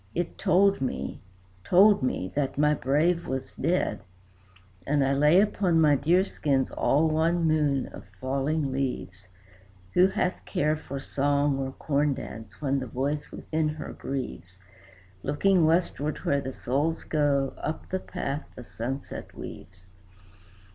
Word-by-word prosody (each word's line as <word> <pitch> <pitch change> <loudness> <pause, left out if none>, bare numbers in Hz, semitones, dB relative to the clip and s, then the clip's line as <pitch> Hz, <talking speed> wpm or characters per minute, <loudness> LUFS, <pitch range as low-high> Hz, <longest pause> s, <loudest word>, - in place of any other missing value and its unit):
It 175 -1 -2
told 195 +1 +3
me 70 - -3 0.4
told 200 - +6
me 95 -7 -2
that 140 -2 -1
my 150 +1 +4
brave 155 +5 +1
was 130 0 -4
dead. 175 +3 0 0.9
"And 145 -1 +2
I 135 - +2
lay 150 +6 +5
upon 195 -5 +2
my 150 -2 +5
deer 170 +7 +3
skins 140 -8 0
all 155 +3 +2
one 165 +2 +1
moon 150 -4 +2
of - - -11
falling 140 +2 -1
leaves 115 -8 -3 0.7
(Who 180 +1 +6
hath 185 -1 -1
care 150 +1 0
for 140 -3 -6
song 140 0 +1
or 135 0 -2
corn 145 -1 0
dance, 110 -4 -9
when 140 -2 0
the 130 - -5
voice 140 +5 -2
within 155 -1 -1
her 155 0 -6
grieves?), 90 -10 -6 0.6
Looking 165 - +3
westward 160 -3 +1
where 140 0 +2
the 130 -1 -5
souls 145 +6 -1
go, 140 -3 +1
up 155 - -4
the 190 - -1
path 150 -6 -4
the 125 - -9
sunset 130 +4 -6
weaves. 95 0 -10
145 Hz, 140 wpm, -27 LUFS, 135-160 Hz, 0.9 s, told